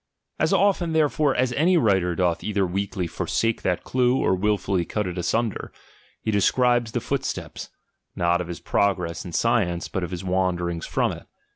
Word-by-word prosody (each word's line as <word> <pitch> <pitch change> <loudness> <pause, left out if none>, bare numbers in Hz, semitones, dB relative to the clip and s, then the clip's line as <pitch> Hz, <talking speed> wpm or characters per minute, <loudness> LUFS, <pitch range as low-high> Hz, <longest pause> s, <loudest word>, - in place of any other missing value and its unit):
As - - +2
often 185 -5 +2
therefore 150 -2 +2
as 125 0 +1
any 170 +6 +3
writer 95 - +2
doth 90 -2 0
either 100 -2 0
weakly 95 +1 -2
forsake 115 +7 -1
that 90 -2 -1
clue, 125 0 +2
or - - +2
wilfully 100 -1 0
cut 105 +4 -2
it 90 -1 -4
asunder; 110 +5 -1 0.5
h( 110 - +1
describes 120 +3 +2
the - - 0
footsteps, - - -4 0.5
not 85 0 +1
of 90 - -5
his 85 -1 -6
progress 90 -4 -1
science, 100 -8 +1
but 95 - -3
of 85 - -3
his 90 0 -5
wanderings 90 -2 -1
from - - +1
it. - - -9
100 Hz, 165 wpm, -24 LUFS, 90-120 Hz, 0.5 s, any